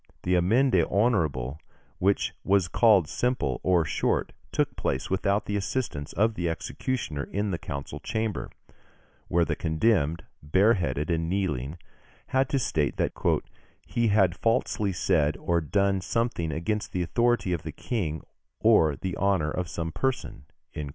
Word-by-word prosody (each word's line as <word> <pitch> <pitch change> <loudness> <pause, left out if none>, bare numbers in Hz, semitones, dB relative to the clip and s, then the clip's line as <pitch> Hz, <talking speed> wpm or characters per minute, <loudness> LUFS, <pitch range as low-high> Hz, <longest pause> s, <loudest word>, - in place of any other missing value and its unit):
The 90 - +1
amende 95 +2 +3
honorable 80 - +1 0.4
which 100 +2 +1
was 95 -2 +3
called 100 -4 +4
simple 120 - -1
or 90 -3 +3
short, - - 0 0.2
took - - 0
place - - -2
without 100 +2 +1
the 105 - -2
assistance 95 - -2
of 110 +2 +2
the 85 -5 -2
executioner 80 - -3
in 100 0 -2
the 85 - -2
council 70 -3 -6
chamber, 110 -4 -3 0.8
where 85 0 +2
the - - -1
condemned, 80 -1 +1 0.2
bareheaded 90 -1 +2
and 80 0 0
kneeling, 85 -6 -1 0.5
had 130 0 +2
to 140 - +1
state 80 - 0
that - - +1 0.7
"he 120 -1 0
had 95 -4 +3
falsely 105 -2 0
said 75 -4 +1
or 85 -1 0
done 100 +4 +1
something 110 -6 -1
against 105 +7 -2
the 90 - 0
authority 120 -1 +1
of 85 - -2
the 80 -1 -6
King 80 -6 -3 0.4
or 75 -3 +4
the 90 +6 -4
honour 95 -6 +1
of 90 0 -3
some 80 -2 -3
person" 130 - -2 0.3
(Fig. 75 -2 -5
90 Hz, 145 wpm, -27 LUFS, 80-105 Hz, 0.8 s, called